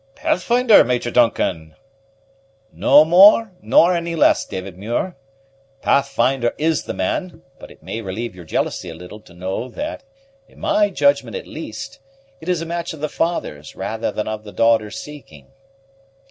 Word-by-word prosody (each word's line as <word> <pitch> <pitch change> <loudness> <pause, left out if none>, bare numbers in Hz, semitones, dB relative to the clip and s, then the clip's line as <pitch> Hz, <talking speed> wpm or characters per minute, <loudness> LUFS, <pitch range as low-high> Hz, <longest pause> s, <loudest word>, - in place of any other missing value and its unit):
"Pathfinder, 235 +4 +4
Major 120 0 -1
Duncan!" 90 -10 +1 1.0
"No 145 +3 +5
more, 200 +6 +6
nor 180 0 +4
any 170 0 -3
less, 160 - +3
David 95 0 -7
Muir. 115 - -3 0.7
Pathfinder 135 -3 +1
is 160 0 0
the - - -4
man; 175 - -3 0.2
but - - -12
it - - -18
may 115 - -5
relieve 110 +3 -5
your 90 - -11
jealousy 85 +2 -2
a 80 - -8
little 90 +5 -11
to 90 -5 -19
know 95 +7 -4
that, 305 - -6 0.5
in - - -21
my 310 0 +2
judgment 285 0 +1
at 475 - -6
least, - - -8 0.4
it 160 - -8
is 175 -2 0
a - - -6
match 170 0 -4
of 160 - -10
the 155 +1 -3
father's 140 - -3
rather - - -3
than - - -4
of 110 0 -5
the 105 - -10
daughter's 110 -2 +1
seeking." 150 -2 -12
135 Hz, 160 wpm, -20 LUFS, 105-175 Hz, 1.0 s, more